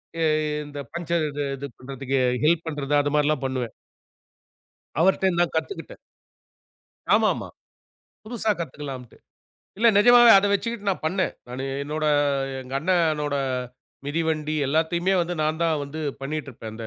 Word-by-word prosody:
ஏ 165 - -3
எ 155 -1 +1
இந்த 145 0 -8
பங்சர் 170 -1 -1
இது 145 0 -3
இது 140 +1 -7
பண்றதுக்கு 135 +1 -3 0.2
ஹெல்ப் 165 +1 +3
பண்றது, 145 -2 -3
அது 145 - -1
மாரிலாம் 150 -2 +1
பண்ணுவேன். 130 -3 -3 1.3
அவர்ட்ட 190 +1 +3
நான் 175 - +2
கத்துக்கிட்டேன். 400 - -4 1.2
ஆமா, - - +3
ஆமா. - - -6 0.8
புதுசா 220 -1 -1
கத்துக்கலாம்ட்டு. 135 -5 -7 0.6
இல்ல 230 +3 +4
நிஜமாவே 240 +2 +8
அத 200 - +3
வச்சுக்கிட்டு 210 0 -2
நான் 185 - -2
பண்னேன். 185 +4 0
நானு 125 +2 -5 0.2
என்னோட, 155 +2 -3 0.6
எங்க 130 +1 -8
அண்ணனோட 155 -3 +1 0.7
மிதிவண்டி 155 0 -1
எல்லாத்தையுமே 165 +6 +1
வந்து 175 +1 -2
நான் 155 +2 -1
தான் 160 -2 +2
வந்து 150 +3 -7 0.2
பண்ணிட்டு 150 +1 -4
இருப்பேன். 115 -3 -9
அந்த 115 0 -7
155 Hz, 135 wpm, -24 LUFS, 140-175 Hz, 1.3 s, நிஜமாவே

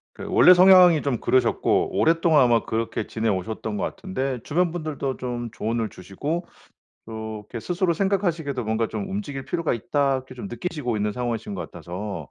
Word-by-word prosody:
그 - - -8
원래 180 - +7
성향이 180 -3 +7
좀 135 -5 -1
그러셨고, 130 - +2
오랫동안 165 -1 +4
아마 120 -2 +3
그렇게 115 0 -2
지내오셨던 110 0 -2
것 105 - -2
같은데. 135 -9 -3
주변 175 +3 +1
분들도 155 -5 -3
좀 120 -2 -4
조언을 110 0 -2
주시고 140 - -5 0.6
이렇게 110 0 -6
스스로 175 - 0
생각하시기에도 170 -8 -1
뭔가 110 +1 0
좀 200 -1 -5
'움직일 190 -9 -5
필요가 165 -2 -1
있다.' 135 +4 0
이렇게 130 0 -10
좀 200 - -6
느끼시고 155 - -3
있는 105 0 -1
상황이신 115 -2 -3
것 90 - -6
같아서. 90 -3 -6
130 Hz, 405 characters per minute, -24 LUFS, 110-170 Hz, 0.6 s, 원래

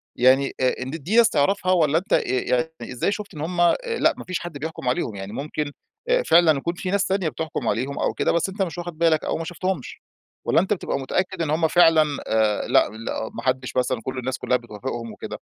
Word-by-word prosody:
يعني، 130 +2 +4
آآ، 130 -1 +2
إن 130 - -4
دي 165 +7 -3
ناس 235 -1 +7
تعرِفها، 185 +4 +1
ولا 160 -4 +3
أنتَ 190 +6 -2
آآ، - - +5
يعني، 125 +3 0 0.2
إزاي 125 +9 0
شُفت 205 -1 -5
إن 150 - -6
هُم 175 +2 -1
آآ 175 - +5 0.2
لا، - - +4
ما - - -7
فيش 185 -2 -3
حد 170 -4 -7
بيحكُم 155 -2 -6
عليهم؟ 120 -3 -1
يعني 95 +1 -7
ممكن 150 +2 -3 0.4
آآ - - +3
فعلًا 165 - +5
يكون 170 +5 -2
في 185 0 -4
ناس 200 0 +2
تانية 190 -4 0
بتحكُم 155 +3 -4
عليهم 130 +4 -1
أو - - 0
كده، - - +1
بس 170 +3 +1
أنتَ 195 +2 -5
مش 180 -2 -2
واخِد 175 -2 -6
بالك، 165 -2 +3
أو - - -1
ما 165 - -4
شفتهمش، 175 -3 -4 0.4
والّا - - +4
أنتَ 190 +3 0
بتبقى 175 - -3
متأكد 185 +7 -2
إن 160 - -1
هُم 160 +2 +2
فعلًا 165 -2 +6 0.2
آآ، 110 -1 +1
لأ - - +4
لأ، 110 +1 -5
ما - - -6
حدِّش 130 0 -1
مثلًا 125 -2 0
كل 130 0 -4
الناس 130 +1 -3
كلها 125 - +1
بتوافِقهم 120 0 -6
وكده؟ - - -7
155 Hz, 230 wpm, -23 LUFS, 130-175 Hz, 0.4 s, ناس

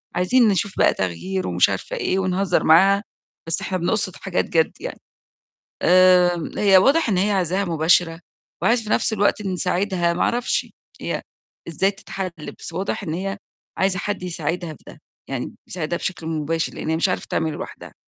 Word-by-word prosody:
عايزين 225 +7 +4
نشوف 200 0 0
بقى - - +4
تغيير 185 - -3
ومش - - +3
عارفة - - -4
إيه 195 - 0
ونهزّر 185 -1 +1
معاها، 195 +6 +5 0.4
بس 165 - -1
إحنا 185 - -2
بنقصد 185 +1 -1
حاجات 190 -2 -2
جَد 160 -1 +2
يعني. - - -6 0.8
آمم، 180 -2 +4
هي 195 -2 +6
واضح 275 - +4
إن 195 - +1
هي 200 +3 +2
عايزاها 190 0 0
مباشرة 165 0 +2 0.4
وعايزة 230 0 +2
في 210 - -8
نَفْس 220 - +1
الوقت 205 0 +1
نساعدها، 185 -2 0
ما - - -3
أعرفش 245 +1 0 0.3
هي - - -3 0.5
إزاي 180 +4 +1
تتحَل، 195 -1 -5 0.3
بس - - -8
واضح 190 +3 -3
إن 160 -5 -3
هي 195 +4 -3 0.4
عايزة 190 -1 +1
حد 200 -1 -3
يساعدها 170 -1 -3
في - - -18
ده، - - -13 0.3
يعني - - -4
يساعدها 170 -1 -3
بشكل 180 -4 -4
مباشر، 160 0 -2
لإن - - -5
هي 160 - +2
مش 170 +4 +1
عارفة 180 - -2
تعمله 160 -2 -1
لوحدها. - - -9
185 Hz, 170 wpm, -22 LUFS, 170-195 Hz, 0.8 s, هي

